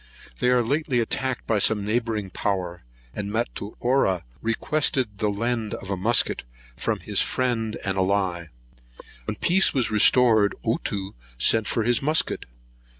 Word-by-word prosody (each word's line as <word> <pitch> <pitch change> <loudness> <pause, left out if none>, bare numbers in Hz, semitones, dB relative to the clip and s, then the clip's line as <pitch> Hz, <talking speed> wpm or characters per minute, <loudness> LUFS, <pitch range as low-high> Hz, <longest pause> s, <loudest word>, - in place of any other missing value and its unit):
They 125 - +2
were 125 -1 +3
lately 140 0 0
attacked 130 +2 -1
by 110 -2 +1
some 105 0 +2
neighbouring 110 -3 -2
power, 90 -3 -3 0.3
and 100 -1 -5
Matuara 110 -2 -1 0.2
requested 115 -2 0
the 105 - +1
lend 115 +1 -2
of 95 - -8
a - - 0
musket 110 +6 +1 0.3
from - - -2
his - - +1
friend 115 -4 -1
and 95 -1 -1
ally. 95 -3 0 0.8
When - - -3
peace 190 -1 +3
was 125 -4 +1
restored, 110 -1 +4
Ottoo 100 -4 -2 0.2
sent 110 - +4
for 115 - 0
his 120 +1 +1
musket. 155 +3 +1
110 Hz, 140 wpm, -24 LUFS, 100-125 Hz, 0.8 s, restored